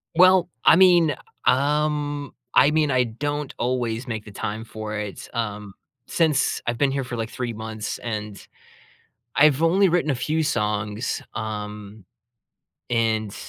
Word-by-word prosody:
Well, 185 +1 +6 0.2
I - - +8
mean, 175 -4 +5 0.3
um 145 +1 +1 0.2
I 145 - +6
mean, 155 -1 +2
I 130 -2 +3
don't 145 +5 -4
always 120 0 -1
make 110 -3 -4
the 105 - -10
time 110 +2 -4
for 110 -1 -6
it, 105 -2 -6
um, 105 -3 -4 0.3
since 155 -5 +1
I've 120 -1 -1
been 140 +1 +2
here 135 0 -1
for, 125 -1 -6
like, 115 -1 -3
3 120 -1 -4
months, 110 -1 -5
and 105 -3 -5 1.0
I've 150 0 +5
only 185 +3 +4
written 165 -3 +1
a - - +2
few 155 +6 -1
songs. 105 -4 -1
Um, 105 -1 -6 0.9
and 110 -3 0
120 Hz, 140 wpm, -23 LUFS, 110-150 Hz, 1.0 s, I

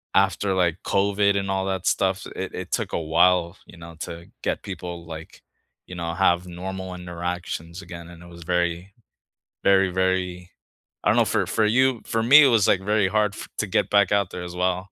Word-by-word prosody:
after, 100 -2 +2
like, 90 -2 +1
COVID 100 0 +2
and 95 0 -4
all 95 0 0
that 95 -2 -2
stuff, 95 +1 +1
it - - -5
it - - -6
took - - -2
a - - 0
while, 85 +2 +3
you 85 - -15
know, 85 0 -11
to 85 0 -7 0.2
get - - -1
people, 85 -3 -7
like, 80 -1 -10 0.5
you 90 - -8
know, 85 -1 -3
have 90 0 +2
normal 95 +1 -6
interactions 90 0 -5
again, 85 -1 -10
and 85 -1 -13
it 85 - -13
was 85 -1 -12
very, 90 +2 -1 0.7
very, 95 -1 +4
very 90 -1 -1 0.5
I - - +2
don't - - +3
know - - +5
for - - 0
for 110 - +1
you 130 +2 +2
for 115 - 0
me, 140 +6 +8
it - - +6
was, 115 -6 +3
like, 95 - +4
very 105 -1 +2
hard 105 0 +1
f - - -8
to 105 - 0
get 95 - 0
back 100 -1 +4
out 100 -2 +2
there 90 - -6
as 90 - -9
well. 90 0 +1
90 Hz, 205 wpm, -24 LUFS, 85-100 Hz, 0.7 s, me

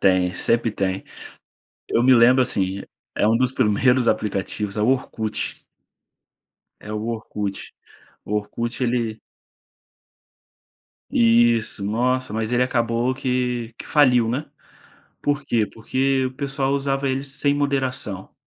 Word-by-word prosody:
Tem, 95 -1 +3
sempre 115 +3 +1
tem. 95 -2 -2 0.8
Eu 115 - +2
me 130 +1 +6
lembro, 125 +2 +6
assim, 100 -5 -1 0.3
eh, - - +2
um 110 +1 +4
dos 130 0 +2
primeiros 125 +1 +2
aplicativos, 105 -1 -2
é 105 - 0
o 110 - +2
Orkut. 115 -4 -2 1.2
É 105 - -8
o 105 +1 -3
Orkut, 105 -3 -4 0.5
o 105 - -3
Orkut 115 +4 -3
ele 120 -3 -1 1.9
Isso, 115 -2 +3
nossa, 125 +3 0
mas 110 0 -2
ele 125 0 +2
acabou 120 0 0
que 125 -3 -2
que - - -8
faliu, 125 -6 +4
né. 135 +6 -3 0.7
Por 145 0 0
quê? 110 -3 +1
Porque 130 +3 0
o 130 - -5
pessoal 135 -1 -2
usava 135 0 0
ele 135 +1 -1
sem 140 +1 0
moderação. 130 -9 -2
120 Hz, 125 wpm, -22 LUFS, 110-130 Hz, 1.9 s, me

